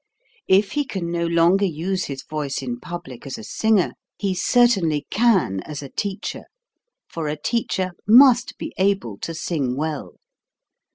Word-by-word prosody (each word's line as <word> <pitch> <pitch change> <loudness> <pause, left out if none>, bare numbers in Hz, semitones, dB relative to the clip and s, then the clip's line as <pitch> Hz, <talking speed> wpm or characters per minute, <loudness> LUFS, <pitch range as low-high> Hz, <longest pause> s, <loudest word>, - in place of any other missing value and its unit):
If 195 +2 +4
he 295 - 0
can 185 -10 -4
no 170 0 0
longer 170 +4 +3
use 185 +3 -2
his 135 -2 -6
voice 145 -3 -4
in 120 -2 -4
public 160 -6 -8
as 135 - -5
a - - -9
singer, 220 - +1 0.2
he 195 -2 -1
certainly 185 -7 +2
can 200 - +2
as 150 -1 -7
a 140 - -8
teacher 200 +5 -4 0.6
for 165 -2 -4
a 150 +1 -2
teacher 190 -2 -1 0.2
must 250 +2 +6
be - - -6
able 190 - 0
to 165 - -5
sing 145 -6 -2
well. 155 -1 -4
175 Hz, 155 wpm, -22 LUFS, 150-200 Hz, 0.6 s, must